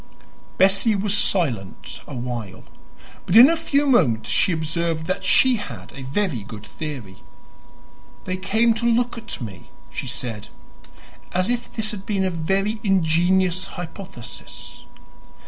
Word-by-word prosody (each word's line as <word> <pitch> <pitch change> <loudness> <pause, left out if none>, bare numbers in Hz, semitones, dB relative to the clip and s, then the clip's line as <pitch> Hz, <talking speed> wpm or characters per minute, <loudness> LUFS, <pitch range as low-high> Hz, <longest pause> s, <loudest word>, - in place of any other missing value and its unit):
Bessie 195 +3 +4
was 205 0 +1
silent 130 - 0
a 145 - -7
while, 120 -5 -5 0.6
but 180 - +1
in 250 +7 +10
a - - +2
few 290 -3 +1
moments 125 - +3
she - - +3
observed 160 0 -1
that 185 +3 -2
she 260 -2 +4
had 205 -1 -8
a 140 - -9
very 140 - -1
good 105 +1 -10
theory. 135 -12 -7 1.1
"They 185 - -3
came 220 +5 +2
to - - -1
look 240 +1 +2
at 235 0 -6
me," 100 -8 -8 0.2
she - - -5
said, 120 -4 -4 0.9
as 185 +5 +1
if 245 0 -3
this 220 -1 -1
had 195 -3 -8
been 200 -3 0
a 185 - 0
very 195 +6 -1
ingenious 185 0 +2
hypothesis. 175 - -9
185 Hz, 140 wpm, -22 LUFS, 135-210 Hz, 1.1 s, in